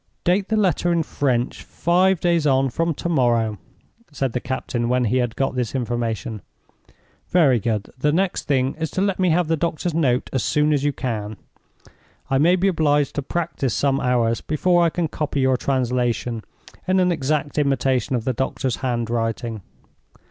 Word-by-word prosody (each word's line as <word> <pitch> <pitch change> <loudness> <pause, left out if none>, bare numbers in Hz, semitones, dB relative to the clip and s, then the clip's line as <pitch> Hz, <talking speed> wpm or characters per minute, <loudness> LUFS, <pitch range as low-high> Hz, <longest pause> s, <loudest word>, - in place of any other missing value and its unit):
"Date 190 +3 +2
the 220 - 0
letter 175 -4 +2
in 170 -1 +2
French 130 -5 -1
five 180 +1 +1
days 170 -3 +2
on 135 -1 +2
from 165 +5 0
to - - -4
morrow," 120 - +1 0.5
said 135 -4 -2
the 125 - 0
captain, 120 -2 -3
when 125 0 +2
he 120 +4 +1
had 120 -3 -1
got 135 - 0
his 125 0 -2
information. 120 -2 -2 0.9
"Very 145 -9 +4
good. 105 -2 -2
The 150 +3 +2
next 185 +3 0
thing 135 -2 +1
is 160 -1 -2
to - - +2
let 200 -2 0
me 185 -1 +3
have 170 0 +2
the 165 - +2
doctor's 170 +1 -2
note 135 -6 +1
as 130 - +1
soon 150 0 +2
as 140 -2 0
you 145 - +2
can. 110 -6 -4 0.9
I 135 - +3
may 170 +5 +5
be 185 +2 +1
obliged 150 -5 +2
to 145 - -2
practice 140 - -2
some 135 +2 +1
hours 120 -3 +1
before 175 +3 +2
I 170 - +4
can 170 0 -1
copy 145 -2 -2
your 130 0 +3
translation 125 -3 -1 0.4
in 185 +1 +3
an 180 -1 +3
exact 150 -1 -1
imitation 135 -1 +1
of 115 -2 -2
the 130 - 0
doctor's 130 0 -2
handwriting. 115 -2 -2
135 Hz, 175 wpm, -22 LUFS, 120-165 Hz, 0.9 s, may